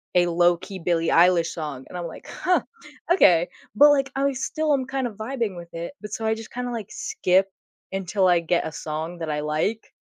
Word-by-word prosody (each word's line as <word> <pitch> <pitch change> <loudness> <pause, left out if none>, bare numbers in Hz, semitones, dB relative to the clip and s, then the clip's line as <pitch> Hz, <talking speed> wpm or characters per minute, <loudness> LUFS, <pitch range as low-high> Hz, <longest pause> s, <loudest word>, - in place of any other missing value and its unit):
a 175 0 +5
low-key 175 +3 +1
Billie 165 -1 0
Eilish 170 -1 +5
song, 150 -6 -6
and - - -7
I'm 175 -1 -4
like, 160 - -11
"Huh, 365 0 +1 0.5
okay," 175 - +5 0.3
but, 290 +7 +8
like, 275 -2 +1
I 275 0 +1
still 300 +4 -1
am 265 -2 0
kind 265 -1 -2
of 220 - -9
vibing 225 -2 -3
with 170 -1 -10
it, 170 +9 -5
but 210 -1 -8
so 225 - -3
I 220 - +2
just 225 0 -10
kinda, 245 0 -4
like, 220 -4 -6
skip 305 - +1 0.4
until 195 0 +1
I 175 -1 +5
get 170 0 0
a 160 - -6
song 160 +3 -5
that 165 -1 -4
I 150 -1 -1
like 155 +9 -2
185 Hz, 210 wpm, -24 LUFS, 170-245 Hz, 0.5 s, but